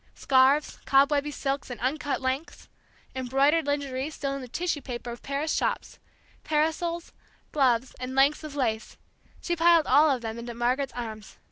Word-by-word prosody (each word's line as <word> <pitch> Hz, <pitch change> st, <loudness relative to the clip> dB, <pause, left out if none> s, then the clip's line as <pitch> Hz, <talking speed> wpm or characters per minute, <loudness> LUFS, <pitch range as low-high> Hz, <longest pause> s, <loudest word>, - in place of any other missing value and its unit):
Scarves, 270 Hz, +3 st, +3 dB
cobwebby 280 Hz, +1 st, +3 dB
silks 275 Hz, -1 st, -3 dB
in 245 Hz, -, -6 dB
uncut 285 Hz, +3 st, -1 dB
lengths, 265 Hz, +4 st, -3 dB, 0.5 s
embroidered 275 Hz, +5 st, +2 dB
lingerie 280 Hz, -1 st, -2 dB
still 280 Hz, -3 st, -4 dB
in 275 Hz, -, -5 dB
the 255 Hz, -, -8 dB
tissue 335 Hz, +3 st, -2 dB
paper 240 Hz, -2 st, -6 dB
of 235 Hz, -, -9 dB
Paris 280 Hz, +3 st, -2 dB
shops, -, -, -2 dB, 0.4 s
parasols, 320 Hz, +2 st, -1 dB, 0.4 s
gloves, 255 Hz, -3 st, +2 dB
and 255 Hz, +1 st, -5 dB
lengths 280 Hz, +3 st, +3 dB
of 300 Hz, -2 st, -7 dB
lace, 225 Hz, -5 st, -2 dB, 0.4 s
she 345 Hz, -, -1 dB
piled 335 Hz, -1 st, +5 dB
all 305 Hz, +2 st, +5 dB
of 260 Hz, -4 st, 0 dB
them 225 Hz, 0 st, -5 dB
into 235 Hz, 0 st, -7 dB
Margaret's 250 Hz, +3 st, 0 dB
arms. 220 Hz, -3 st, -7 dB
275 Hz, 155 wpm, -27 LUFS, 255-300 Hz, 0.5 s, piled